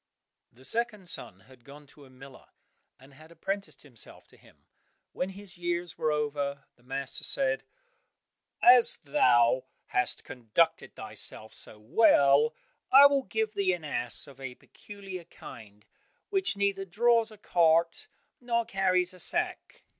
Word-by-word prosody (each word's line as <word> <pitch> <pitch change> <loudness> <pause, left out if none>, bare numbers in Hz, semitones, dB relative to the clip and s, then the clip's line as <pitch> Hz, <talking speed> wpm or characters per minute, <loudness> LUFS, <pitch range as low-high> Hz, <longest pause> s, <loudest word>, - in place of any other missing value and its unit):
The 130 +3 -15
second 225 - -1
son 95 - -4
had 125 +4 -20
gone 145 +3 -14
to 140 +1 -18
a - - -18
miller 130 +1 -15 0.5
and 135 +2 -18
had 155 +4 -16
apprenticed 195 +3 -5
himself 125 -7 -8
to - - -21
him. - - -23 0.5
When 180 - -3
his 195 -2 -13
years 175 0 -3
were 155 - 0
over, 145 -2 -2
the - - -29
master 135 +2 -6
said, 265 -2 0 1.0
"As 245 -1 +7
thou 125 - +3 0.2
hast 125 - -1
conducted 135 +4 -1
thyself 110 0 -7
so 110 - -9
well, 140 - +4 0.4
I 275 +2 +10 0.2
give 220 -1 -1
thee 195 -3 +1
an 175 -2 -6
ass 120 -5 -1
of 135 -2 -15
a 130 -2 -6
peculiar 195 0 -10
kind, 105 -7 -13 0.5
which 380 - +1
neither 200 -1 0
draws 230 +4 +2
a 215 - -13
cart 170 - +2 0.3
nor 235 -1 -1
carries 185 -2 +1
a 185 - -14
sack." - - -1
165 Hz, 140 wpm, -29 LUFS, 135-200 Hz, 1.0 s, I